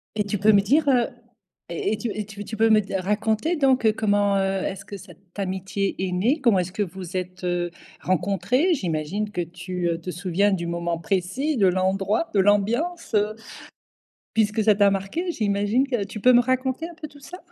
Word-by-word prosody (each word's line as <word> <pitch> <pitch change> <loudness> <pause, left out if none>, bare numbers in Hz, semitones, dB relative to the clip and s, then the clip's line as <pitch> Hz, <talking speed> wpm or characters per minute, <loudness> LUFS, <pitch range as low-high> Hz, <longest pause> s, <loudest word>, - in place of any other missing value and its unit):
Et 210 - 0
tu 205 0 -2
peux 210 +3 +5
me 200 - +5
dire, 285 +9 +2
heu 245 -3 +3 0.6
et 405 - -1
et - - -2
tu 235 0 -3
et 210 0 -4
tu 205 +1 -8
peux 225 0 +4
me 215 -1 +5
d 195 0 -6
raconter 215 - 0
donc 265 -6 +2
heu, 215 - +5
comment, 205 -2 +2
heu, 195 0 0
est-ce 195 +1 -4
que 200 +1 -8
cette 190 0 -15
amitié 190 +1 -2
est 185 - -3
née? 230 - +1
Comment 230 -8 +4
est-ce 180 +1 -3
que 210 - 0
vous 185 -1 -8
êtes, 185 0 -4
heu, 175 -1 -1 0.3
rencontrées? 195 - +1
J'imagine 185 - -2
que - - -5
tu, 175 +1 -4
heu, 165 0 -1
te 180 - -5
souviens 185 +3 +1
du 170 -3 -1
moment 170 0 -2
précis, 215 - -1
de 195 -3 +4
l'endroit, 190 - 0
de 200 - +4
l'ambiance, 225 - +1
heu, 210 +1 +1 1.0
puisque 215 0 +1
ça 210 -1 +4
t'a 200 -1 +5
marquée. 260 - -2
J'imagine 210 +4 +1
que, 240 -6 -1
tu 210 +1 -8
peux 250 +3 +6
me 245 - +7
raconter 260 +5 -1
un 345 - -11
peu 310 -2 -8
tout 285 0 -17
ça? 360 +6 -10
205 Hz, 205 wpm, -24 LUFS, 185-235 Hz, 1.0 s, me